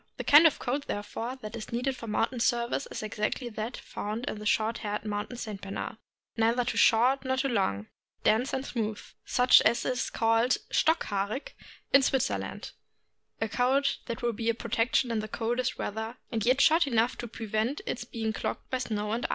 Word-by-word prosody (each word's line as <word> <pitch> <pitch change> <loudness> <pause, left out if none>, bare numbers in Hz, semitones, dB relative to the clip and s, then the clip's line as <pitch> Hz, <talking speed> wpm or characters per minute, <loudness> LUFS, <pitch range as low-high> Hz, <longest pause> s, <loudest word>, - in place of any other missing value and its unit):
The - - -4
kind 305 +3 +8
of 315 - +1
a - - -15
coat, 275 +3 -2
therefore, 225 +4 -4
that 215 +2 -6
is 220 -2 -7
needed 250 +3 -1
for 230 - -9
mountain 225 +3 0
service 240 +3 0
is - - -5
exactly 215 +4 -2
that 220 +2 -5
found 215 +4 -5
in 215 - -4
the 210 - -4
short 220 +1 +1
haired 210 0 -4
mountain 210 +3 -3
St. 215 -4 -6
Bernard 195 +2 -5 0.2
— - - -42
neither 230 +2 +3
too 235 -2 -2
short 250 +6 +4
nor 260 0 0
too 270 +1 +1
long, 110 - 0 0.4
dense 230 +5 +3
and 265 0 -2
smooth, 220 -5 -2 0.3
such 250 0 +6
as 235 - +2
is 255 0 -1
called 225 +2 +2
' - - -30
' - - -34
stock 320 +2 +3
haarig 205 +6 -2 0.2
" - - -24
in 275 - +8
Switzer 255 - +1
land; 95 - -7 0.7
a 225 - 0
coat 265 +5 +1
that 235 +2 -5
will 240 -1 +1
be 225 +1 -2
a 230 - +2
protection 235 +1 +1
in 225 - 0
the 215 - -4
coldest 240 +2 -1
weather, 220 +3 -4
and 225 -1 -1
yet 260 +3 +4
short 325 -1 +5
enough 235 -1 +2
to 240 - -4
prevent 225 +4 -2
its 245 - -3
being 225 -2 -3
clogged - - -4
by 255 - 0
snow 210 -4 -2
and 230 +2 -1
ice. - - -22
230 Hz, 215 wpm, -29 LUFS, 215-255 Hz, 0.7 s, kind